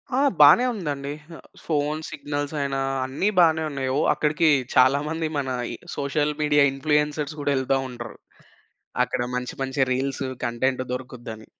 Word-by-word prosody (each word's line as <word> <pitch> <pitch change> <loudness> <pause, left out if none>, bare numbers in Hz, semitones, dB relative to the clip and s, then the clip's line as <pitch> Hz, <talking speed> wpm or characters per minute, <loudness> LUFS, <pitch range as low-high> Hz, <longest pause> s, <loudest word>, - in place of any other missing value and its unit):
ఆ! - - +2 0.2
బానే 150 +12 +8
ఉందండి. 145 -8 -4 0.3
ఆహ్, - - -14 0.2
ఫోను 150 0 -1
సిగ్నల్స్ 145 0 -4
అయినా 140 -1 -1 0.3
అన్ని 140 +10 0
బానే 160 -2 +4
ఉన్నాయి. 135 -2 -3
ఓ - - +2
అక్కడికి 155 +2 +1 0.3
చాలా 130 +2 +5
మంది 160 0 -2
మన 135 -2 -2 0.2
ఈ - - -5 0.2
సోషల్ 145 +1 0
మీడియా 150 -1 +3
ఇన్‌ఫ్లూయెన్సర్స్ 150 +1 0
గూడా 145 -1 0
ఎళ్తా 130 +1 +1
ఉంటరు. 120 -2 -8 0.9
అక్కడ - - -3
మంచి 125 0 -3
మంచి 135 +1 -2
రీల్స్, 135 +1 -2 0.2
కంటెంట్, 130 +2 0
దొరుకుద్దని. 120 -4 -7
140 Hz, 145 wpm, -24 LUFS, 130-150 Hz, 0.9 s, బానే